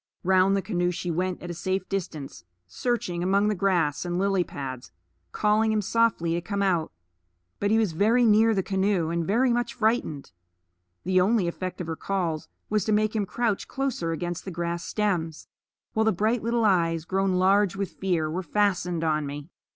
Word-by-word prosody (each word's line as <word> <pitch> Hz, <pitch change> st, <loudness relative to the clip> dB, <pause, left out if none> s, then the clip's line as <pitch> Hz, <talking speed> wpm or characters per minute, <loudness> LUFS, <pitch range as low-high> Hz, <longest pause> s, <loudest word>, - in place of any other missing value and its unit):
Round 190 Hz, +1 st, +4 dB
the 195 Hz, -, -2 dB
canoe 175 Hz, -4 st, 0 dB
she 180 Hz, 0 st, -3 dB
went 180 Hz, +2 st, -2 dB
at 175 Hz, -, -5 dB
a -, -, -4 dB
safe 185 Hz, +2 st, -2 dB
distance, 155 Hz, -, -5 dB, 0.2 s
searching 195 Hz, -, -2 dB
among 200 Hz, +3 st, +2 dB
the -, -, +1 dB
grass 175 Hz, -6 st, +1 dB
and 175 Hz, 0 st, -2 dB
lily 195 Hz, -1 st, +2 dB
pads, 130 Hz, -, -7 dB, 0.4 s
calling 215 Hz, -, +2 dB
him 215 Hz, -1 st, +1 dB
softly 220 Hz, -6 st, +1 dB
to 170 Hz, -, -1 dB
come 200 Hz, +2 st, -2 dB
out. 175 Hz, -5 st, +1 dB, 0.7 s
But 200 Hz, -, 0 dB
he 220 Hz, -, +4 dB
was 220 Hz, -5 st, +2 dB
very 220 Hz, +9 st, +3 dB
near 220 Hz, 0 st, +5 dB
the 190 Hz, -, +1 dB
canoe, 190 Hz, -4 st, 0 dB
and 170 Hz, 0 st, 0 dB
very 240 Hz, +4 st, +3 dB
much 240 Hz, 0 st, -1 dB
frightened; 220 Hz, -, -1 dB, 0.7 s
the 185 Hz, +1 st, +3 dB
only 200 Hz, -1 st, +2 dB
effect 185 Hz, +2 st, -4 dB
of -, -, -4 dB
her 160 Hz, 0 st, -4 dB
calls 170 Hz, -4 st, -2 dB, 0.2 s
was 210 Hz, -2 st, +1 dB
to 220 Hz, -, 0 dB
make 215 Hz, +1 st, +2 dB
him 205 Hz, -3 st, 0 dB
crouch 230 Hz, -2 st, -1 dB
closer 265 Hz, -12 st, -2 dB
against 175 Hz, +1 st, -3 dB
the -, -, -6 dB
grass 170 Hz, -1 st, -3 dB
stems, 175 Hz, -7 st, -2 dB, 0.5 s
while 220 Hz, -, +2 dB
the 220 Hz, -, +3 dB
bright 220 Hz, +5 st, 0 dB
little 230 Hz, 0 st, +1 dB
eyes, 165 Hz, -5 st, +2 dB
grown 195 Hz, +1 st, 0 dB
large 195 Hz, +1 st, +3 dB
with 195 Hz, -1 st, -3 dB
fear, 175 Hz, -5 st, -1 dB
were 165 Hz, +4 st, -3 dB
fastened 180 Hz, -4 st, 0 dB
on 155 Hz, -2 st, 0 dB
me. 145 Hz, +2 st, -7 dB
190 Hz, 190 wpm, -26 LUFS, 170-210 Hz, 0.7 s, near